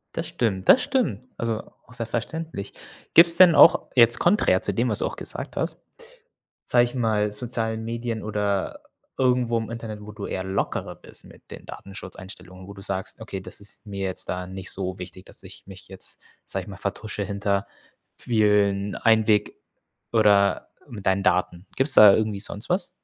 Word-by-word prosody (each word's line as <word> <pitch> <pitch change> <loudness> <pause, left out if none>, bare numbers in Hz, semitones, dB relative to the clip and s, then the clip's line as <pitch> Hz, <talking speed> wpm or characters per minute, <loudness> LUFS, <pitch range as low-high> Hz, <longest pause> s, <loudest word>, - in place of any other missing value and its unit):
Das - - -3
stimmt, 95 -6 -2
das 255 - +8
stimmt. 250 - 0 0.2
Also, 115 -1 -2 0.2
auch - - -17
sehr 115 -1 -4
verständlich. 120 -1 -5 0.4
Gibt's 170 0 +7
denn 180 -3 +8
auch, 170 - +7
jetzt 120 -1 +6
konträr 195 +5 +3
zu - - -1
dem, - - 0
was - - +1
du - - 0
auch - - -4
gesagt - - -6
hast, - - -2 0.9
sage 120 -1 +4
ich 120 - -5
mal, 110 -4 0
sozialen 110 0 -3
Medien 115 -1 -4
oder 105 -2 -2 0.4
irgendwo 125 -2 +2
im 110 0 -5
Internet, 115 -2 -6
wo 105 0 -10
du 105 -1 -7
eher 95 - -3
lockerer 95 +1 -2
bist - - -12
mit - - -18
den - - -10
Datenschutzeinstellungen, 95 -1 -10
wo 100 - -10
du 100 - -11
sagst: 95 +2 -4
„Okay, 100 -3 -6
das 95 - -11
ist 100 +1 -11
mir 100 -1 -5
jetzt 95 - -4
da 90 0 -3
nicht 95 0 -6
so 95 -1 -4
wichtig, 90 +1 -10
dass - - -12
ich - - -13
mich 95 -1 -12
jetzt, 95 0 -8 0.3
sage - - -4
ich - - -15
mal, - - -8
vertusche 110 -1 -4
hinter 100 0 -1 0.5
vielen 105 -3 +2
Einweg 110 -2 +2 0.6
oder 100 -3 +3 0.2
mit 105 -5 -9
deinen 95 +1 +2
Daten.“ 90 -1 0
Gibt's 135 +1 +1
da 105 -2 +9
irgendwie 105 -2 -1
sonst 100 +1 -3
was? 180 0 0
105 Hz, 180 wpm, -24 LUFS, 100-115 Hz, 0.9 s, da